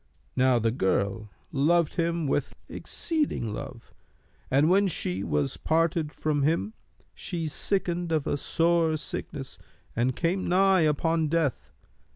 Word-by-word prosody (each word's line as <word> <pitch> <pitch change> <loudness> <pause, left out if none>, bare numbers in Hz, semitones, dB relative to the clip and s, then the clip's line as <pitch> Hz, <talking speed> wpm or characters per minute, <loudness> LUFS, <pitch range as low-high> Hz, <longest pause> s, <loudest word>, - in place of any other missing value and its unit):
Now 130 -1 +4
the 115 -1 +1
girl 100 0 -1 0.2
loved 160 +3 +2
him 170 -2 0
with 140 0 -1
exceeding 300 - -2
love, 130 -1 -8 0.6
and 140 +4 +4
when 195 +3 +4
she 95 - -1
was 75 -6 -1
parted 165 -1 +1
from 150 -2 -1
him, 165 +9 +1 0.4
she 170 -3 -4
sickened 175 +1 -1
of 155 -3 +1
a - - 0
sore 165 +1 +2
sickness 140 -2 -6 0.4
and 125 +2 +1
came 180 +3 0
nigh 190 0 +4
upon 160 +1 +1
death. 155 -4 -1
155 Hz, 130 wpm, -27 LUFS, 130-170 Hz, 0.6 s, Now